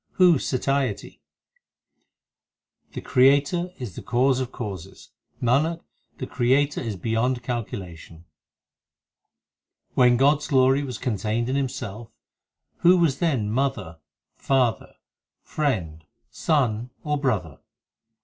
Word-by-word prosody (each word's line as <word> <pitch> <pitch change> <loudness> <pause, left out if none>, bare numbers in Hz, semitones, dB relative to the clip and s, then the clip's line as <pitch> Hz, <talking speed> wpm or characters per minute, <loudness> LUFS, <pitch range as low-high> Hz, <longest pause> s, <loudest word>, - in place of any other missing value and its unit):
who 180 -6 +5
satiety? 135 -4 -2 1.7
The - - -5
Creator 145 +7 +3
is 120 -8 -7
the - - -7
Cause 130 +2 +1
of 130 -1 -3
causes; 95 -6 -8 0.3
Nanak, 150 +8 +1 0.4
the 130 - -4
Creator 135 +4 +1
is 115 -4 -4
beyond 115 +5 -1
calculation. 90 -9 -6 1.6
5 - - -37
When 125 -1 +5
God 140 +3 +4
s 150 - -8
glory 135 -1 +3
was 130 -5 -5
contained 110 +2 -2
in 130 - -1
Himself, 120 -5 -4 0.7
Who 180 +2 +5
was 165 -6 +1
then 130 -12 0
mother, 115 -10 -2 0.4
father, 130 -4 0 0.6
friend, 90 - -2 0.3
son, 125 -7 0
or 150 -1 -1
brother 100 - -2
125 Hz, 110 wpm, -24 LUFS, 110-140 Hz, 1.7 s, who